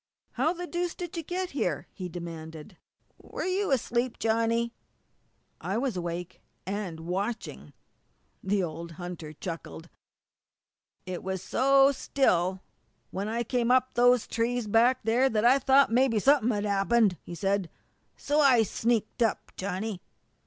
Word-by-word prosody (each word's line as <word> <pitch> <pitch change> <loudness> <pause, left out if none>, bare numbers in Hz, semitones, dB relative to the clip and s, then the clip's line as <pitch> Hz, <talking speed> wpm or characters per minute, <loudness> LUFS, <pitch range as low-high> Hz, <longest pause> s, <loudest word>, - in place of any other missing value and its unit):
"How 270 +7 +1
the 355 0 -5
deuce 350 0 -3
did 350 -1 -6
you 335 - -2
get 360 +3 -4
here?" 175 - -2
he 185 -2 -6
demanded. 165 0 -8 0.4
"Were - - -6
you 380 +2 0
asleep, 245 -2 0
Johnny?" 230 +1 +1 0.9
"I 195 - -2
was 255 -2 -1
awake 175 0 -5 0.2
and 190 -4 -4
watching!" 195 +7 -4 0.7
The 195 0 +1
old 165 0 -6
hunter 175 -2 -7
chuckled. 165 +1 -7 1.2
"It 185 -1 -5
was 190 -1 -4
so 275 +4 +4
still 190 -10 +1 0.5
when 195 +2 -3
I 230 +2 -1
come 240 0 0
to 255 0 +5
those 245 -1 +4
trees 235 +1 -1
back 230 +5 +3
there 240 +5 +3
that 220 -1 0
I 260 +3 +6
thought 270 -1 +4
mebby 245 -1 +3
something 265 +1 +4
had 210 -3 0
'appened," 200 -1 +2
he 175 - -8
said. 195 -1 0 0.5
"So, 295 +2 0
I 260 -6 +6
sneaked 225 +2 -1
up, 225 -2 0
Johnny." 195 +1 -4
225 Hz, 140 wpm, -28 LUFS, 185-255 Hz, 1.2 s, I